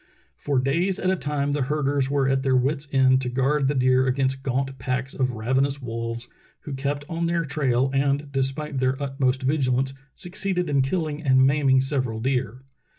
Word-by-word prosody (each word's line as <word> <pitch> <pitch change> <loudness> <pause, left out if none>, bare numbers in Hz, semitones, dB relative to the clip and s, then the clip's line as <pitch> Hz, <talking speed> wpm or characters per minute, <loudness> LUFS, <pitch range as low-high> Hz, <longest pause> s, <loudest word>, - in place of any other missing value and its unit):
For 145 -2 -2
days 170 +9 +1
at 185 - 0
a - - +2
time 145 -4 -2
the 145 0 -1
herders 140 -1 0
were 140 -1 +1
at 135 0 +1
their 135 -1 +1
wits' 140 +3 0
ends 130 -1 +4
to 125 - -3
guard 135 +3 +1
the 145 - 0
deer 130 0 +3
against 135 0 0
gaunt 135 0 -2
packs 130 +2 -2
of 130 -2 -1
ravenous 130 +5 0
wolves, 115 -1 -5 0.3
who 145 - -7
kept 140 +2 -3
on 170 +1 -2
their 170 -1 0
trail 135 -3 0
and, 140 +1 0
despite 135 +1 -2
their 130 +1 0
utmost 135 -1 -1
vigilance, 135 -1 +1 0.2
succeeded 180 -2 -2
in 140 -1 +3
killing 155 +1 -2
and 130 -3 +4
maiming 135 -1 +3
several 130 -5 -2
deer. 125 0 -2
135 Hz, 180 wpm, -24 LUFS, 130-145 Hz, 0.3 s, ends